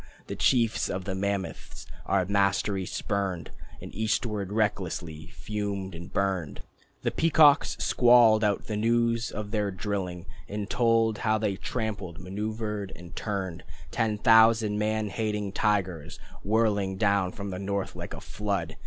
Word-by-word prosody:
The 100 - -5
chiefs 115 +3 +2
of 95 0 -3
the 95 - -2
mammoths 100 0 -4 0.2
our 95 -2 +2
mastery 100 -1 +1
spurned, 100 -4 -3 0.3
And - - -9
eastward 105 -2 -1
restlessly 90 -7 -2
fumed 100 -3 -4
and 85 +3 -9
burned. 95 -6 -2 0.4
The - - +1
peacocks 155 -2 +4
squalled 120 -3 +5
out 105 -2 +1
the 110 - -3
news 115 +2 +1
of 105 -1 -6
their 105 -2 0
drilling 95 -3 -4 0.2
And 105 0 -4
told 115 -2 +2
how 110 0 +2
they 105 -2 -1
trampled, 105 -5 -4
maneuvered, 105 +1 -4
and 85 -1 -12
turned. 95 -5 -4 0.3
Ten 110 -2 0
thousand 110 -1 +5
man 110 0 0
hating 105 -1 -2
tigers 95 -6 -1 0.3
Whirling 105 -3 +1
down 100 -3 +2
from 100 -1 -6
the 90 - -5
north, 100 0 -3
like - - -6
a - - -9
flood! 100 -6 -3
105 Hz, 140 wpm, -27 LUFS, 95-110 Hz, 0.4 s, squalled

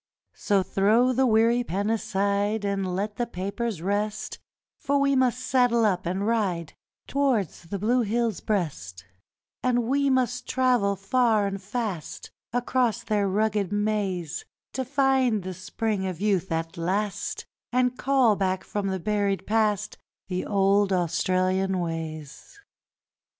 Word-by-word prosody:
So 200 -3 +1
throw 220 +7 +3
the 260 +1 +3
weary 230 +2 +3
pen 200 +1 -1
aside 205 0 0
And 195 -2 -1
let 205 +2 -3
the 240 - -1
papers 200 -1 -4
rest, 205 +2 -2 0.4
For 285 -3 +1
we 275 0 +3
must 255 -2 +2
saddle 245 -3 +3
up 185 -4 0
and 190 +3 -1
ride 195 -8 0 0.3
Towards 255 - 0
the 200 +4 -4
blue 235 +6 +2
hill's 230 -1 0
breast; 95 - -3 0.6
And 245 -1 +2
we 275 +4 +1
must 250 -2 0
travel 250 -6 +2
far 215 +2 +2
and 195 -1 -3
fast 205 - -5 0.2
Across 245 -1 0
their 205 -2 +1
rugged 205 -1 0
maze, 200 -6 -1 0.3
To 260 - -2
find 260 -5 +2
the 185 0 -5
Spring 190 +2 -2
of 180 -3 -5
Youth 195 -3 0
at 165 0 -2
last, 195 +4 -2 0.3
And 250 0 +2
call 260 -5 +3
back 190 -1 -1
from 205 -1 -3
the 190 -1 -1
buried 200 0 0
past 215 -2 0 0.3
The 185 0 -2
old 200 0 +3
Australian 185 +2 +1
ways. 160 - -6
205 Hz, 135 wpm, -26 LUFS, 190-240 Hz, 0.6 s, throw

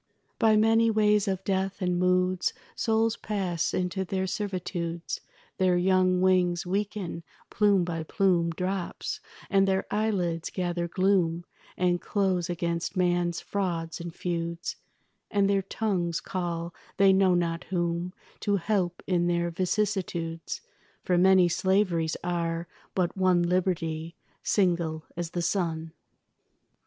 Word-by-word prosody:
By 220 -1 +5
many 225 +1 +4
ways 210 -1 +3
of 190 -1 -1
death 195 0 -1
and 180 -1 0
moods 180 0 +2 0.2
Souls 225 -1 +1
pass 190 -7 -1
into 185 +1 -1
their 190 0 -2
servitudes. 180 -4 -3 0.4
Their 185 -1 +3
young 185 0 +3
wings 180 -1 +3
weaken, 195 -2 -2 0.3
plume 205 -4 +3
by 170 -2 -3
plume 175 0 +2
Drops, 180 +2 -3 0.3
and 195 -1 +3
their 190 0 +1
eyelids 185 -6 0
gather 175 -2 -2
gloom 175 -2 +1 0.3
And 175 -1 +1
close 190 -4 0
against 170 +1 -2
man's 175 -1 +1
frauds 170 -5 -2
and 170 0 -5
feuds, 170 0 -3 0.5
And 200 -1 +2
their 200 -1 +2
tongues 185 -4 -1
call 170 -2 -3 0.2
they 195 -1 +6
know 190 -1 +4
not 170 -1 -1
whom 175 -1 -1 0.3
To 205 - +1
help 185 -2 -1
in 175 -2 +1
their 170 0 +1
vicissitudes; 180 -3 -2 0.4
For 180 - +1
many 185 0 +6
slaveries 175 -3 +1
are, 170 -1 -1 0.3
but 180 -2 0
one 185 -2 +3
Liberty, 170 -2 -1 0.3
single 170 -5 +1
as 170 -1 -3
the 175 0 -3
sun. 165 -3 -1
180 Hz, 125 wpm, -28 LUFS, 170-195 Hz, 0.5 s, they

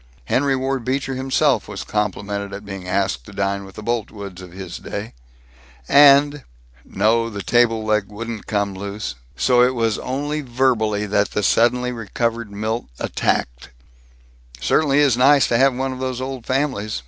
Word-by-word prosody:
Henry 135 - +1
Ward 130 -1 -2
Beecher 135 +2 -1
himself 135 +2 +1
was 105 -2 -6
complimented 100 -1 -3
at 100 +1 -7
being 95 -2 -7
asked 95 -9 0
to - - -10
dine 100 0 -2
with 95 - -14
the 110 - -8
Boltwoods 100 -5 -4
of 90 -2 -11
his 95 -1 -8
day, 105 +2 -6 0.7
and 145 0 +6 0.2
" - - -29
No, 115 +3 +1
the 100 -3 -6
table 115 -2 +2
leg 105 -2 +1
wouldn't 115 +1 -7
come 100 -2 -1
loose, 100 -3 -5 0.2
so 125 -1 +3
it 125 +1 +3
was 115 -2 0
only 145 +4 -3
verbally 120 -5 +1
that 100 0 +1
the 105 - -2
suddenly 125 +4 +2
recovered 115 0 -2
Milt 110 +3 -3
attacked: - - -2 0.9
"Certainly 140 - +2
is 135 -5 +3
nice 135 +1 +5
to 115 - +3
have 135 -1 +4
one 130 +1 -2
of 130 - -8
those 130 -1 -3
old 130 -2 -6
families. 130 - -1
115 Hz, 165 wpm, -21 LUFS, 100-130 Hz, 0.9 s, and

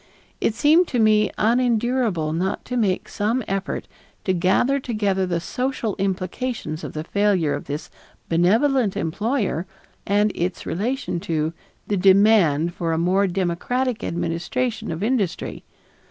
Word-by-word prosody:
It 220 - 0
seemed 320 +7 +4
to 250 - -2
me 215 -1 +4
unendurable 235 -7 +1
not 185 +4 -2
to 250 - -4
make 205 -6 0
some 225 +5 -1
effort 195 0 -3 0.4
to 185 - +1
gather 190 +10 +2
together 205 -7 0
the 170 -1 0
social 250 +2 -2
implications 190 -2 -3
of - - -6
the 155 - -4
failure 190 -5 +1
of 145 - -4
this 145 +2 -5 0.4
benevolent 215 - +2
employer 195 - -1 0.4
and 205 +1 +3
its 180 +1 -3
relation 225 +1 -2
to 160 -3 -1 0.3
the 205 - -1
demand 190 -5 +4
for 165 -2 -2
a - - 0
more 185 +4 +2
democratic 200 +7 -1
administration 175 +8 -2
of 165 +4 -4
industry. 220 -6 -1
200 Hz, 135 wpm, -22 LUFS, 175-235 Hz, 0.4 s, seemed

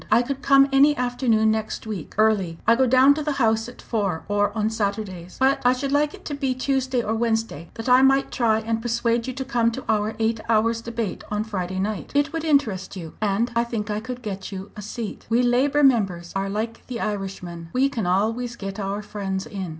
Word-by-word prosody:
I 230 +3 +5
could 275 +2 -4
come 275 -1 +6
any 285 +2 +5
afternoon 245 -3 +2
next 220 0 -3
week, 205 -8 -6
early 205 -6 +2
I 230 - +6
go 260 +1 +3
down 260 +3 +6
to 305 - -3
the 300 -1 -1
House 225 -3 +1
at 245 - -14
four 195 -8 -1
or 205 0 +1
on 215 +1 +1
Saturdays. 200 -5 -3
But 270 +1 +3
I 250 0 +5
should 270 +2 -3
like 295 +1 +1
it - - -18
to 295 - -4
be 270 -3 -1
Tuesday 260 -1 0
or 220 - -1
Wednesday, 225 -8 -1
that 225 +1 -6
I 250 +1 +6
might 270 +1 +3
try 220 -3 +2
and 225 0 -2
persuade 235 0 0
you 255 - -3
to 265 +1 -5
come 240 -3 +2
to 265 - -6
our 215 0 0
Eight 225 0 0
Hours 230 +1 +2
debate 230 -3 -4
on 210 0 -1
Friday 190 -4 -4
night. 205 +2 -3
It 290 +2 +2
would 325 -1 -2
interest 255 - +1
you, 165 -4 -7
and 215 +3 +1
I 235 - +3
think 225 -3 -3
I 210 - -1
could 250 +2 -7
get 195 -3 -5
you 195 0 -7
a 210 - -7
seat. 215 +1 -6
We 235 +2 +3
Labour 270 +4 +3
members 195 -10 +2
are 195 0 -1
like 220 +3 -4
the 245 -2 -5
Irishmen 190 -5 -5
we 260 +2 +3
can 225 -9 -3
always 225 +6 0
get 195 -2 -6
our 200 +1 -3
friends 195 -2 -4
in. 190 -3 -5
225 Hz, 220 wpm, -23 LUFS, 205-255 Hz, -, come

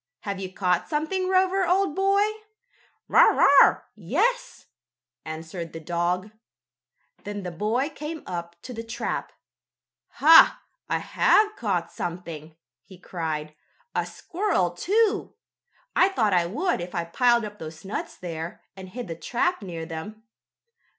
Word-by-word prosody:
"Have 200 -1 -4
you 190 -1 -5
caught 180 -2 0
something, 350 +5 -1
Rover, 380 +1 +3
old 375 -3 +2
boy?" 390 +1 +3 0.8
"Bow - - +5
wow! - - +6
Yes!" - - -1 0.6
answered 160 +1 -7
the 165 - -6
dog. 175 +4 -1 0.9
Then 205 -1 -5
the 180 - -4
boy 225 - -1
came 305 +2 -7
up 170 -1 -6
to 255 - -7
the 225 - -5
trap. 230 +1 -4 0.8
"Ha! 325 +2 +7 0.3
I - - +1
have 425 0 +3
caught 185 - -2
something!" 165 -3 -6 0.3
he 190 - -15
cried. 160 -4 -4 0.4
"A - - -1
squirrel, 350 - -1
too! 415 - 0 0.6
I 370 - +5
thought 220 - +1
I 175 -1 +3
would 295 - -1
if 175 +2 -7
I 170 - 0
piled 235 +7 +2
up 210 0 -9
those 160 +2 -9
nuts 195 - -5
there, 165 -1 -6
and 190 -1 -10
hid 240 +3 -7
the 165 - -4
trap 245 - -1
near 170 -4 -6
them. 175 +7 -8
200 Hz, 135 wpm, -25 LUFS, -, 0.9 s, Ha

